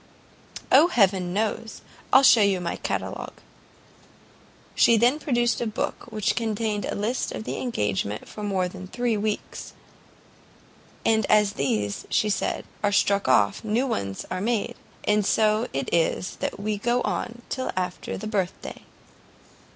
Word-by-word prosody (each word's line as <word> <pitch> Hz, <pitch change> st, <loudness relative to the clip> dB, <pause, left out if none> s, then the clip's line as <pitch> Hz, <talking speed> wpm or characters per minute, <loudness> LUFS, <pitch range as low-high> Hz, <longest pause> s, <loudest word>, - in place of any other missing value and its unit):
"O, 290 Hz, +6 st, +7 dB
heaven 190 Hz, -, +2 dB
knows; 220 Hz, +3 st, -2 dB, 0.3 s
I'll 265 Hz, -, +7 dB
shew 240 Hz, -4 st, +7 dB
you 200 Hz, -2 st, +3 dB
my 170 Hz, -1 st, -3 dB
catalogue." -, -, -4 dB, 1.4 s
She 235 Hz, -, +5 dB
then 245 Hz, +7 st, +3 dB
produced 240 Hz, -6 st, +1 dB
a 235 Hz, -, 0 dB
book 215 Hz, -, -3 dB
which 215 Hz, -2 st, 0 dB
contained 220 Hz, -2 st, -1 dB
a -, -, -3 dB
list 220 Hz, +5 st, -1 dB
of 220 Hz, -, -6 dB
engagements 105 Hz, -, -2 dB
for 210 Hz, -, -8 dB
more 195 Hz, -3 st, 0 dB
than 185 Hz, +1 st, -9 dB
three 240 Hz, +2 st, -1 dB
weeks. 210 Hz, 0 st, -4 dB, 1.3 s
"And 220 Hz, -2 st, +3 dB
as 210 Hz, -1 st, +4 dB
these," 105 Hz, -, -2 dB
she 210 Hz, -, +2 dB
said, -, -, -1 dB, 0.2 s
"are 205 Hz, -, +2 dB
struck 200 Hz, -2 st, +2 dB
off, 105 Hz, -, +3 dB
new 225 Hz, +4 st, +1 dB
ones 100 Hz, -, -3 dB
are 185 Hz, 0 st, -2 dB
made; 225 Hz, 0 st, 0 dB, 0.3 s
and 210 Hz, 0 st, +2 dB
so 215 Hz, +2 st, +2 dB
it 135 Hz, -1 st, -3 dB
is 170 Hz, +2 st, 0 dB, 0.2 s
we 210 Hz, 0 st, -2 dB
go 240 Hz, +3 st, +1 dB
on 240 Hz, +1 st, -3 dB
till 260 Hz, -1 st, -2 dB
after 180 Hz, -1 st, -3 dB
the 215 Hz, -, -7 dB
birth 200 Hz, -4 st, -1 dB
day." -, -, -9 dB
210 Hz, 145 wpm, -25 LUFS, 185-230 Hz, 1.4 s, O